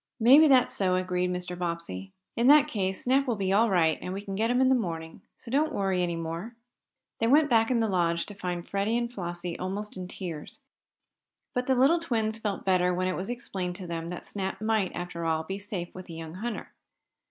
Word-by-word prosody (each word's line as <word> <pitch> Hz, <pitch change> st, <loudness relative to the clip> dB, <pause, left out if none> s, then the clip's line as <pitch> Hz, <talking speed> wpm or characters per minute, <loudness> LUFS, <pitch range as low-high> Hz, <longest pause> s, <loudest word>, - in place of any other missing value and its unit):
"Maybe 270 Hz, +7 st, +8 dB
that's 260 Hz, -3 st, +5 dB
so," 185 Hz, -2 st, +1 dB
agreed 180 Hz, 0 st, 0 dB
Mr. 180 Hz, 0 st, -3 dB
Bobbsey. 170 Hz, -, -4 dB, 0.2 s
"In 235 Hz, +2 st, +2 dB
that 295 Hz, +1 st, +7 dB
case 190 Hz, -8 st, -2 dB
Snap 270 Hz, +2 st, +2 dB
will 240 Hz, -, +1 dB
be 195 Hz, -2 st, 0 dB
all 225 Hz, +3 st, +4 dB
right, 165 Hz, -4 st, +3 dB
and 180 Hz, -, -4 dB
we 200 Hz, -, -4 dB
can 200 Hz, -1 st, -6 dB
get 220 Hz, +4 st, 0 dB
him 245 Hz, +1 st, +2 dB
in 260 Hz, -, +5 dB
the 265 Hz, -, +5 dB
morning. 165 Hz, -9 st, -3 dB, 0.2 s
So 235 Hz, -, -10 dB
don't 305 Hz, +4 st, +2 dB
worry 195 Hz, -7 st, 0 dB
any 175 Hz, -1 st, 0 dB
more." 165 Hz, +8 st, -5 dB, 0.6 s
They 225 Hz, -, +2 dB
went 290 Hz, +3 st, +4 dB
back 225 Hz, -1 st, +4 dB
in 240 Hz, -3 st, +2 dB
the 225 Hz, -, +2 dB
Lodge, 170 Hz, -3 st, +1 dB
to 205 Hz, -, -9 dB
find 180 Hz, -3 st, -4 dB
Freddie 200 Hz, +4 st, 0 dB
and 240 Hz, 0 st, -2 dB
Flossie 175 Hz, -3 st, -5 dB
almost 195 Hz, +2 st, -4 dB
in 180 Hz, -1 st, -5 dB
tears. 170 Hz, -5 st, -7 dB, 1.0 s
But 250 Hz, -1 st, -1 dB
the 265 Hz, -, +3 dB
little 275 Hz, +7 st, +4 dB
twins 225 Hz, -8 st, -1 dB
felt 210 Hz, -3 st, -3 dB
better 180 Hz, -1 st, +3 dB
when 185 Hz, +1 st, 0 dB
it 185 Hz, -, -1 dB
was 190 Hz, +4 st, -4 dB
explained 190 Hz, -7 st, -4 dB
to 185 Hz, -, -8 dB
them 165 Hz, -1 st, -4 dB
that 175 Hz, +1 st, -6 dB
Snap 190 Hz, -2 st, -4 dB
might, 215 Hz, -3 st, +1 dB
after 175 Hz, -1 st, -5 dB
all, 160 Hz, -1 st, 0 dB
be 195 Hz, +4 st, -5 dB
safe 200 Hz, -4 st, -5 dB
with 185 Hz, 0 st, -9 dB
the 165 Hz, -, -8 dB
young 160 Hz, -1 st, -7 dB
hunter. 220 Hz, +5 st, -5 dB
190 Hz, 220 wpm, -28 LUFS, 175-230 Hz, 1.0 s, Maybe